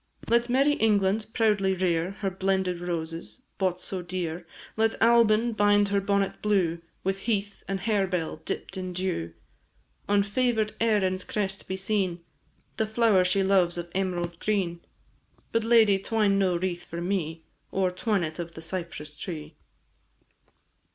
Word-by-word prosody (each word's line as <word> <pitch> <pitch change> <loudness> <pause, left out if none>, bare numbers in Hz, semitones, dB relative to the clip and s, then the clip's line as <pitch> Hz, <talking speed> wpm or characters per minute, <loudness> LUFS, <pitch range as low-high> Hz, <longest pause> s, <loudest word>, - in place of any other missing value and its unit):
Let 235 +1 +3
merry 275 +4 +4
England 210 -3 +2
proudly 205 -4 +2
rear 175 -2 +1
Her 195 -2 0
blended 190 -1 0
roses, 165 +6 -5 0.2
bought 185 -2 +1
so 185 -1 -4
dear; 175 -1 -4 0.3
Let 225 0 +1
Albin 230 0 +4
bind 205 -1 +4
her 200 0 +2
bonnet 200 0 0
blue 185 -6 +1 0.2
With 195 +1 -1
heath 205 -2 -2
and 195 0 -2
harebell 195 -6 0
dipp'd 190 - -4
in 185 -1 -4
dew. 175 - -2 0.8
On 200 0 +4
favour'd 220 0 0
Erin's 195 -5 +1
crest 195 -2 -3
be 190 - -3
seen 190 -3 -1 0.6
The 220 - +1
flower 220 -4 +4
she 190 +2 +2
loves 185 -3 +3
of 175 0 -5
emerald 175 -3 -2
green; 190 -5 0 0.7
But, 230 0 +1
lady, 220 -4 +5
twine 205 -1 +2
no 185 -2 +2
wreath 175 -1 -2
for 170 - -7
me, 170 -3 -2 0.3
Or 190 -1 +1
twine 200 +1 0
it 155 +1 -5
of 170 -1 -6
the 160 - -8
cypress 160 -4 -6
tree! 155 -4 -6
195 Hz, 145 wpm, -27 LUFS, 175-210 Hz, 0.8 s, lady